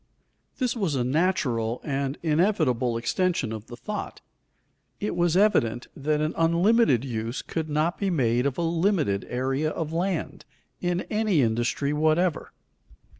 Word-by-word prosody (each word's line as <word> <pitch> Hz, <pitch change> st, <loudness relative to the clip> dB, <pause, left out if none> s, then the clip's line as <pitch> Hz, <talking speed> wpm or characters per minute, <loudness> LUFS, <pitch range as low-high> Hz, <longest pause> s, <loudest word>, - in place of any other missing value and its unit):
_ -, -, -37 dB
This 255 Hz, -2 st, 0 dB
was 190 Hz, -10 st, -1 dB
a 125 Hz, -, +1 dB
natural 125 Hz, -6 st, 0 dB
and 140 Hz, -1 st, -2 dB
inevitable 150 Hz, -, +1 dB
extension 160 Hz, 0 st, 0 dB
of 110 Hz, 0 st, -7 dB
the 120 Hz, -, -8 dB
thought. 210 Hz, +7 st, -5 dB, 0.8 s
It 210 Hz, -, -2 dB
was 175 Hz, 0 st, +2 dB
evident 120 Hz, -, +2 dB
that 150 Hz, +2 st, 0 dB
an 155 Hz, +1 st, 0 dB
unlimited 170 Hz, -, +3 dB
use 115 Hz, -1 st, -4 dB
could 160 Hz, -2 st, -4 dB
not 155 Hz, +4 st, 0 dB
be 200 Hz, -, 0 dB
made 125 Hz, -6 st, +2 dB
of 135 Hz, -, -3 dB
a 170 Hz, -, 0 dB
limited 165 Hz, -, +1 dB
area 135 Hz, +5 st, 0 dB
of 160 Hz, 0 st, -4 dB
land, 175 Hz, 0 st, -2 dB, 0.4 s
in 175 Hz, 0 st, -1 dB
any 210 Hz, -9 st, +2 dB
industry 120 Hz, +5 st, 0 dB
whatever. 155 Hz, +2 st, +1 dB
155 Hz, 145 wpm, -26 LUFS, 125-180 Hz, 0.8 s, unlimited